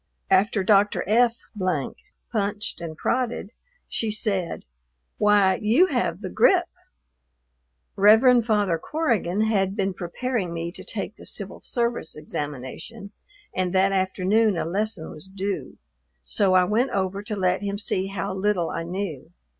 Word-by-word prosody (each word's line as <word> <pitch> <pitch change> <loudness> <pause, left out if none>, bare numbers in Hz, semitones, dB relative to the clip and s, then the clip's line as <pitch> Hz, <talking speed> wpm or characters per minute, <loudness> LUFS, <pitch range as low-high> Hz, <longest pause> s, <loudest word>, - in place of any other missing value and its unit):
After 200 0 +3
Dr. 205 +1 +3
F 235 +2 +3 0.9
punched 210 -3 -2
and 160 -2 -6
prodded, 235 -3 -1 0.4
she 225 - -2
said, 200 -5 -1 0.5
"Why, 205 -2 +4
you 230 +12 +5
have - - -1
the - - -4
grippe." 385 -8 +4 1.3
Rev. 225 +5 +6
Father 205 -7 +1
Corrigan 220 - 0
had 200 -3 +1
been 195 -2 0
preparing 185 +1 -3
me 170 +1 -3
to - - -10
take 210 0 -5
the - - -13
Civil 195 -2 -5
Service 235 -8 -2
examination, 150 - -6 0.4
and 185 0 -1
that 190 +1 +4
afternoon 195 +2 +2
a - - -1
lesson 195 0 -2
was 155 +5 -11
due, 195 +1 -4 0.5
so 190 - +2
I 185 - +6
went 220 +8 +1
over 195 0 -1
to 210 +1 -4
let 185 -1 +1
him 200 0 -2
see 195 -2 -1
how 195 -2 -3
little 190 -3 0
I 165 - -3
knew. 175 -4 -5
200 Hz, 140 wpm, -24 LUFS, 185-220 Hz, 1.3 s, Rev